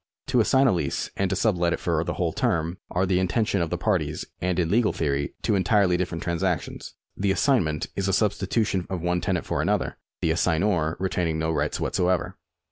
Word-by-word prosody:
To 125 -2 +3
assign 130 +4 +4
a 130 - +5
lease 80 -6 -2
and 95 -1 0
to 95 - 0
sub 100 -2 +1
let 85 -1 +2
it - - -3
for 80 -2 0
the 85 -1 -3
whole 85 -3 -1
term 85 +3 0
are 90 - 0
in - - +1
the 90 -1 +2
intention 95 +1 +1
of 85 - -1
the - - -2
parties - - -1 0.2
and 90 0 0
in 85 -2 +1
legal 115 +1 +3
theory 70 -2 -1
two - - +1
entirely 95 -1 +3
different 90 -2 -2
transactions. 85 -1 -2 0.2
The 100 0 0
assignment 95 - +1
is 100 0 -1
a 95 - +1
substitution 100 -1 0
of 95 -3 -3
one 90 0 0
tenant 90 -3 -1
for - - -1
another, - - -1 0.2
the 80 - +1
assignor 80 -1 +1
retaining 90 -3 -1
no 80 +1 0
rights 75 -1 -1
whatever. 90 0 0
90 Hz, 210 wpm, -25 LUFS, 85-95 Hz, 0.2 s, a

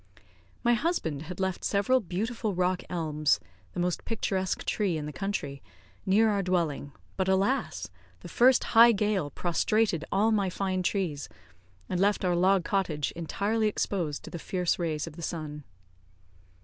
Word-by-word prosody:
My 240 - +4
husband 235 - -1
had 175 +3 -8
left 190 -1 -1
several 205 +6 +2
beautiful 215 +2 -3
rock 180 0 +1
elms 155 -4 +1 0.3
(the - - -4
most 175 0 -1
picturesque 190 -4 -2
tree 195 -6 0
in 150 - -4
the 150 - -6
country) 145 -6 -3 0.5
near 210 +4 +5
our 200 -1 +1
dwelling, 170 -6 -1 0.3
but 190 - 0
alas! 195 +8 +1 0.3
the - - -9
first 255 +1 +4
high 235 +1 +8
gale 205 -6 0
prostrated 175 +3 +1
all 210 +4 +3
my 200 -3 +2
fine 185 0 -1
trees, 175 -6 -2 0.6
and 180 - -2
left 200 0 +2
our 180 -1 +2
log 185 0 +3
cottage 170 -8 0
entirely 205 +6 -1
exposed 175 -7 -2
to - - -9
the 170 - -5
fierce 180 +1 -1
rays 155 -3 -1
of 165 -1 -10
the - - -7
sun. 155 -3 -5
185 Hz, 155 wpm, -28 LUFS, 165-205 Hz, 0.6 s, high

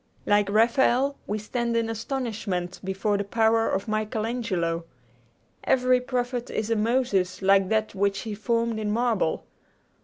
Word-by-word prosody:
Like 205 -1 +3
Raphael, 245 +5 +3
we 210 - -1
stand 235 +2 -2
in 230 -1 +1
astonishment 220 -6 -3
before 195 +2 -1
the - - 0
power 225 +2 +2
of 195 +2 -2
Michael 215 0 -1
Angelo. 180 -9 -2 0.8
Every 255 -1 +3
prophet 245 -1 -2
is 220 +1 -2
a - - +3
Moses, 210 -5 0
like 195 -1 +4
that 220 0 0
which 200 0 0
he 220 - -5
formed 230 +1 -1
in 210 -1 -2
marble. 225 -6 0
220 Hz, 145 wpm, -26 LUFS, 200-235 Hz, 0.8 s, like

